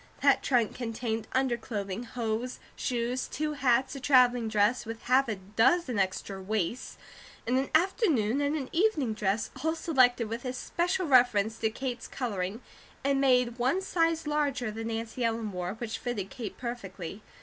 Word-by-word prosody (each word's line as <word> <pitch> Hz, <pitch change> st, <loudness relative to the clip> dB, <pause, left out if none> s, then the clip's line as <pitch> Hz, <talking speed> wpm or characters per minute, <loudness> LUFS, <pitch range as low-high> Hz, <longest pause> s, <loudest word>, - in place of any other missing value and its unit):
That -, -, +5 dB
trunk 240 Hz, -5 st, +2 dB
contained 225 Hz, -2 st, -3 dB
underclothing, 235 Hz, -5 st, -2 dB
hose, 235 Hz, +1 st, -3 dB, 0.2 s
shoes, 245 Hz, +1 st, -1 dB
two 305 Hz, 0 st, -2 dB
hats, 260 Hz, -2 st, +2 dB
a -, -, -5 dB
travelling 250 Hz, -3 st, +4 dB
dress 215 Hz, +3 st, +2 dB
with 225 Hz, 0 st, -7 dB
half 260 Hz, +2 st, +3 dB
a 220 Hz, -, -1 dB
dozen 225 Hz, -, +1 dB
extra 190 Hz, 0 st, -2 dB
waists, 210 Hz, +3 st, -2 dB, 0.5 s
and 245 Hz, -, +1 dB
an 265 Hz, +1 st, +1 dB
afternoon 315 Hz, -, +2 dB
and 285 Hz, +1 st, +1 dB
an 275 Hz, -4 st, -3 dB
evening 330 Hz, -, +2 dB
dress, 210 Hz, 0 st, -1 dB
all 320 Hz, +1 st, +1 dB
selected 255 Hz, -8 st, +3 dB
with 230 Hz, +2 st, -5 dB
especial 345 Hz, +8 st, -1 dB
reference 235 Hz, -6 st, +4 dB
to 220 Hz, -, +1 dB
Kate's 245 Hz, +1 st, -5 dB
colouring, 210 Hz, -3 st, -3 dB, 0.4 s
and 275 Hz, 0 st, +2 dB
made 250 Hz, -2 st, +3 dB
one 260 Hz, +10 st, +2 dB
size 330 Hz, -4 st, 0 dB
larger 290 Hz, -6 st, 0 dB
than 225 Hz, +1 st, -5 dB
Nancy 230 Hz, +2 st, -3 dB
Ellen 225 Hz, -2 st, -1 dB
wore, 180 Hz, +1 st, -4 dB
which 225 Hz, -1 st, -5 dB
fitted 210 Hz, -6 st, -4 dB
Kate 225 Hz, -5 st, -6 dB
perfectly. 200 Hz, -6 st, -6 dB
240 Hz, 155 wpm, -29 LUFS, 220-270 Hz, 0.5 s, That